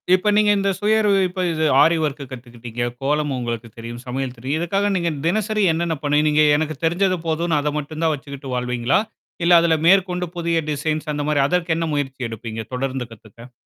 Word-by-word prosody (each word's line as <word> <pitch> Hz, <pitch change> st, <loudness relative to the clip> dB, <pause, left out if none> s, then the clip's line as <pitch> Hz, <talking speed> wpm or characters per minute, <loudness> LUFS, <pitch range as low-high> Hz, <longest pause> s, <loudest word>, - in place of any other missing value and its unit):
இப்ப 185 Hz, +3 st, 0 dB
நீங்க 210 Hz, 0 st, +4 dB
இந்த 195 Hz, 0 st, +1 dB
சுயவறிவிப்பு 200 Hz, -3 st, +2 dB
இது 160 Hz, -1 st, 0 dB, 0.2 s
ஆரி 165 Hz, +3 st, +5 dB
ஒர்க்கு 145 Hz, -1 st, -2 dB
கத்துக்கிட்டீங்க, 120 Hz, -2 st, -7 dB, 0.2 s
கோலம் 145 Hz, +1 st, 0 dB
உங்களுக்கு 120 Hz, -1 st, -4 dB
தெரியும், 115 Hz, +1 st, -7 dB
சமையல் 130 Hz, 0 st, -3 dB
தெரியும், 135 Hz, +6 st, -2 dB
இதுக்காக 195 Hz, +4 st, 0 dB
நீங்க 170 Hz, -2 st, 0 dB, 0.2 s
தினசரி 215 Hz, +4 st, +1 dB
என்னென்ன 165 Hz, 0 st, -1 dB
பண்ணுணீங்க? 150 Hz, +1 st, +3 dB
எனக்கு 155 Hz, 0 st, -2 dB
தெரிஞ்சது 185 Hz, +3 st, +2 dB
போதும்ன்னு 160 Hz, -1 st, +1 dB
அத 150 Hz, +1 st, -1 dB
மட்டும் 155 Hz, +2 st, -5 dB
தான் 160 Hz, -1 st, +3 dB
வச்சுக்கிட்டு 140 Hz, -2 st, -8 dB
வாழ்வீங்களா? 125 Hz, 0 st, +1 dB, 0.4 s
இல்ல 175 Hz, +1 st, +5 dB
அதில 165 Hz, -1 st, +3 dB
மேற்கொண்டு 180 Hz, -1 st, +3 dB
புதிய 170 Hz, -1 st, 0 dB
டிசைன்ஸ் 155 Hz, +1 st, -2 dB
அந்த 145 Hz, -, -2 dB
மாரி 150 Hz, -1 st, +1 dB
அதற்கு 175 Hz, 0 st, 0 dB
என்ன 165 Hz, -, -1 dB
முயற்சி 135 Hz, -2 st, -3 dB
எடுப்பீங்க 115 Hz, 0 st, -6 dB
தொடர்ந்து 130 Hz, 0 st, -2 dB
கத்துக்க? 115 Hz, +2 st, -14 dB
150 Hz, 170 wpm, -21 LUFS, 130-175 Hz, 0.4 s, ஆரி